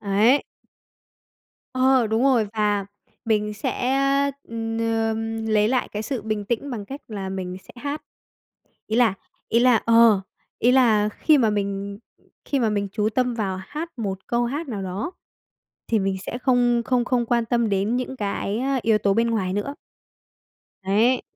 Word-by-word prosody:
Ấy. 215 Hz, +7 st, +3 dB, 1.3 s
Ờ, 255 Hz, -2 st, +3 dB
đúng 220 Hz, +2 st, 0 dB
rồi 255 Hz, -5 st, +3 dB
và 210 Hz, -2 st, 0 dB, 0.4 s
mình 210 Hz, -1 st, 0 dB
sẽ, 245 Hz, +4 st, -2 dB, 0.6 s
ừm, 225 Hz, 0 st, -3 dB
ờ, 225 Hz, -1 st, 0 dB, 0.4 s
lấy 210 Hz, 0 st, +4 dB
lại 255 Hz, 0 st, 0 dB
cái 210 Hz, -, -3 dB
sự 235 Hz, 0 st, -3 dB
bình 215 Hz, -1 st, -2 dB
tĩnh 235 Hz, +6 st, -2 dB
bằng 220 Hz, -5 st, -5 dB
cách 275 Hz, +7 st, -8 dB
là 200 Hz, -4 st, -5 dB
mình 185 Hz, -1 st, -4 dB
sẽ -, -, -15 dB
hát. 290 Hz, +1 st, -3 dB, 0.9 s
Ý 220 Hz, -, -1 dB
là 235 Hz, -4 st, +4 dB, 0.4 s
ý 235 Hz, -, +3 dB
là 245 Hz, -1 st, +5 dB
ờ, 230 Hz, -3 st, +6 dB, 0.4 s
ý 245 Hz, -, +4 dB
là 225 Hz, -5 st, +4 dB
khi 300 Hz, +7 st, +3 dB
mà 225 Hz, -4 st, +3 dB
mình 200 Hz, -1 st, -3 dB, 0.5 s
khi 280 Hz, -, 0 dB
mà 230 Hz, -3 st, +2 dB
mình 205 Hz, -1 st, -1 dB
chú 210 Hz, +1 st, 0 dB
tâm 250 Hz, +2 st, 0 dB
vào 195 Hz, -5 st, -2 dB
hát 315 Hz, -4 st, -6 dB
một 195 Hz, -3 st, -2 dB
câu 240 Hz, 0 st, +1 dB
hát 290 Hz, +7 st, -3 dB
nào 210 Hz, -6 st, -4 dB
đó 190 Hz, -, -4 dB, 0.8 s
thì 225 Hz, -, +2 dB
mình 195 Hz, -1 st, 0 dB
sẽ 245 Hz, -, -4 dB
không 245 Hz, -2 st, +2 dB
không 245 Hz, 0 st, +1 dB
không 245 Hz, -1 st, 0 dB
quan 235 Hz, 0 st, +1 dB
tâm 235 Hz, -1 st, +1 dB
đến 200 Hz, +4 st, 0 dB
những 255 Hz, +1 st, -3 dB
cái 205 Hz, 0 st, -2 dB, 0.2 s
yếu 220 Hz, -1 st, +3 dB
tố 200 Hz, -2 st, +1 dB
bên 230 Hz, +2 st, +2 dB
ngoài 190 Hz, -5 st, -1 dB
nữa. 205 Hz, +9 st, -3 dB, 1.1 s
Đấy. 220 Hz, +7 st, +2 dB
225 Hz, 170 wpm, -23 LUFS, 205-245 Hz, 1.3 s, ờ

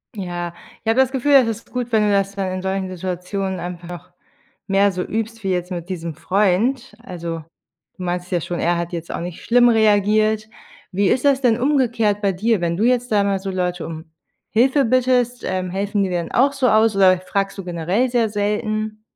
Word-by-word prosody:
Ja. 175 Hz, -3 st, -4 dB, 0.3 s
Ich -, -, -1 dB
habe 225 Hz, +3 st, +2 dB
das 265 Hz, -1 st, +4 dB
Gefühl, 275 Hz, +2 st, +1 dB
es 260 Hz, -4 st, +6 dB
ist 225 Hz, 0 st, -5 dB
gut, 245 Hz, -1 st, -3 dB
wenn 220 Hz, -2 st, +3 dB
du 210 Hz, -, +2 dB
das 200 Hz, 0 st, +1 dB
dann 195 Hz, -2 st, -2 dB
in 185 Hz, 0 st, -3 dB
solchen 190 Hz, 0 st, -2 dB
Situationen 185 Hz, +1 st, -4 dB
einfach 175 Hz, 0 st, -8 dB, 0.6 s
mehr 200 Hz, 0 st, +3 dB
so 180 Hz, -1 st, -3 dB
übst 225 Hz, +2 st, -4 dB
wie 190 Hz, -, 0 dB
jetzt 180 Hz, 0 st, -2 dB
mit 175 Hz, -1 st, -5 dB
diesem 170 Hz, -3 st, -5 dB
Freund. 210 Hz, -, 0 dB
Also, 170 Hz, -6 st, -5 dB, 0.6 s
du 185 Hz, -, -7 dB
meinst 180 Hz, 0 st, -3 dB
ja 175 Hz, -, +1 dB
schon, 175 Hz, +2 st, -4 dB
er 175 Hz, +1 st, +1 dB
hat 170 Hz, 0 st, -3 dB
jetzt 170 Hz, -1 st, -5 dB
auch -, -, -4 dB
nicht 175 Hz, -1 st, -7 dB
schlimm 245 Hz, +1 st, +5 dB
reagiert. 215 Hz, 0 st, +3 dB, 0.4 s
Wie 200 Hz, +1 st, +1 dB
ist 250 Hz, -, +1 dB
das 280 Hz, -2 st, +4 dB
denn 240 Hz, -3 st, +3 dB
umgekehrt 235 Hz, -6 st, +1 dB
bei 200 Hz, -2 st, +1 dB
dir, 215 Hz, +3 st, +1 dB
wenn 170 Hz, -1 st, 0 dB
du 210 Hz, -, 0 dB
jetzt 245 Hz, 0 st, +1 dB
da 205 Hz, -2 st, +3 dB
mal 200 Hz, -1 st, 0 dB
so 195 Hz, 0 st, -4 dB
Leute 180 Hz, -2 st, -2 dB
um 160 Hz, 0 st, -9 dB, 0.4 s
Hilfe 265 Hz, +5 st, +3 dB
bittest? 250 Hz, 0 st, +1 dB
Ähm, 185 Hz, -1 st, -2 dB
helfen 200 Hz, +2 st, -1 dB
die 190 Hz, -, -1 dB
dann 175 Hz, -2 st, -3 dB
auch 270 Hz, +3 st, +3 dB
so 270 Hz, -2 st, +1 dB
aus 220 Hz, 0 st, +4 dB
oder 185 Hz, -2 st, +5 dB
fragst 195 Hz, +1 st, -2 dB
du 195 Hz, -, -5 dB
generell 180 Hz, +8 st, 0 dB
sehr 235 Hz, -2 st, +2 dB
selten? 215 Hz, +1 st, -2 dB
200 Hz, 205 wpm, -20 LUFS, 180-225 Hz, 0.6 s, es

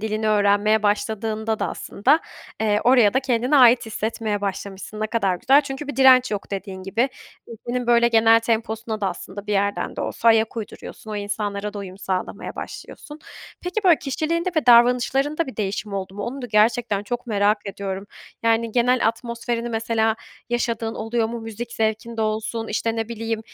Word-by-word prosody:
dilini 215 Hz, 0 st, -1 dB
öğrenmeye 205 Hz, +1 st, +3 dB
başladığında 220 Hz, +1 st, -1 dB
da -, -, -1 dB
aslında, 275 Hz, +10 st, +1 dB, 0.4 s
eee, 210 Hz, -1 st, +2 dB
oraya 245 Hz, -4 st, +5 dB
da 265 Hz, -, +3 dB
kendine 255 Hz, +2 st, +1 dB
ait 245 Hz, -2 st, +6 dB
hissetmeye 220 Hz, -1 st, -2 dB
başlamışsın. 200 Hz, +1 st, -5 dB
Ne 215 Hz, -, 0 dB
kadar 200 Hz, -5 st, 0 dB
güzel 270 Hz, +8 st, +5 dB
çünkü 275 Hz, +1 st, -6 dB
bir 275 Hz, -, -5 dB
direnç 255 Hz, -2 st, +6 dB
yok 205 Hz, -1 st, -4 dB
dediğin 195 Hz, -1 st, -5 dB
gibi. 230 Hz, +8 st, 0 dB, 0.4 s
Ülkenin, 240 Hz, +2 st, -5 dB
böyle, 235 Hz, 0 st, +4 dB
genel 225 Hz, 0 st, +5 dB
temposuna 225 Hz, -1 st, -2 dB
da 195 Hz, -, +1 dB
aslında 195 Hz, +3 st, -8 dB
bir 210 Hz, -, -2 dB
yerden 200 Hz, -2 st, -1 dB
de -, -, -3 dB
olsa 230 Hz, -, 0 dB
ayak 225 Hz, 0 st, +3 dB
uyduruyorsun, 220 Hz, 0 st, -8 dB
o 210 Hz, -, -3 dB
insanlara 205 Hz, 0 st, -3 dB
da -, -, -5 dB
uyum 190 Hz, -1 st, -8 dB
sağlamaya 185 Hz, -2 st, -4 dB
başlıyorsun. 295 Hz, +1 st, -9 dB, 0.4 s
Peki, 385 Hz, +4 st, -3 dB
böyle, 345 Hz, -4 st, +6 dB
kişiliğinde 330 Hz, +6 st, -1 dB
ve 305 Hz, -, +1 dB
davranışlarında 250 Hz, +6 st, +4 dB
bir 260 Hz, -, -9 dB
değişim 205 Hz, 0 st, -3 dB
oldu 190 Hz, -1 st, -4 dB
mu? 205 Hz, -, -5 dB
Onu 260 Hz, +4 st, -5 dB
da -, -, -4 dB
gerçekten 215 Hz, -1 st, +2 dB
çok 240 Hz, +3 st, -5 dB
merak 205 Hz, -1 st, +2 dB
ediyorum. 195 Hz, 0 st, -5 dB, 0.4 s
Yani, 230 Hz, 0 st, +1 dB
genel 250 Hz, -1 st, +3 dB
atmosferini 235 Hz, 0 st, -3 dB
mesela 225 Hz, -1 st, 0 dB, 0.3 s
yaşadığın 235 Hz, -2 st, -1 dB
oluyor 225 Hz, +1 st, -1 dB
mu? 235 Hz, 0 st, -5 dB
Müzik 225 Hz, +1 st, -7 dB
zevkinde 225 Hz, +1 st, -1 dB
olsun, 220 Hz, +1 st, -2 dB
işte, 225 Hz, +1 st, -1 dB
ne 225 Hz, 0 st, -2 dB
bileyim 225 Hz, -1 st, -3 dB
225 Hz, 170 wpm, -22 LUFS, 210-240 Hz, 0.4 s, ait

